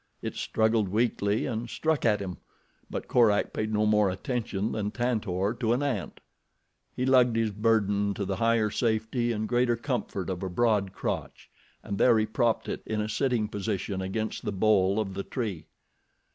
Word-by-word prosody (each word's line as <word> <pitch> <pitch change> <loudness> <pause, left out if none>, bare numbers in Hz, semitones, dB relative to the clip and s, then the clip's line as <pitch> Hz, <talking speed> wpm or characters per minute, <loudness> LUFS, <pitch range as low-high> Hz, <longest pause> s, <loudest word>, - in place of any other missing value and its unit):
It - - -3
struggled 110 -2 +1
weakly 105 -1 +1
and 120 -2 -3
struck 160 -1 0
at 105 -3 +3
him; 90 -2 -5 0.5
but - - -5
Korak 110 -4 +3
paid 110 0 -2
no 105 0 +2
more 105 -2 +4
attention 110 +1 -2
than 105 -2 -2
Tantor 110 -4 -1
to 115 -2 +2
an 130 +4 0
ant. 120 - -3 0.7
He 125 - -1
lugged 125 -3 +4
his 115 -1 +1
burden 100 -2 +1
to 100 - -2
the 95 0 -2
higher 115 -1 +2
safety 115 +2 0
and 110 -1 -2
greater 120 0 +2
comfort 115 -7 -3
of 90 - -4
a 95 - -3
broad 105 -1 +1
crotch, - - -5 0.3
and 100 - -4
there 120 -3 +5
he 110 - +2
propped 115 +1 0
it - - -4
in 110 -1 -1
a 105 - -1
sitting 120 -1 0
position 100 -2 -3
against 110 +4 -3
the - - -2
bole 100 0 +3
of 100 -3 -2
the 100 - -3
tree. 100 - -4
110 Hz, 175 wpm, -28 LUFS, 100-115 Hz, 0.7 s, there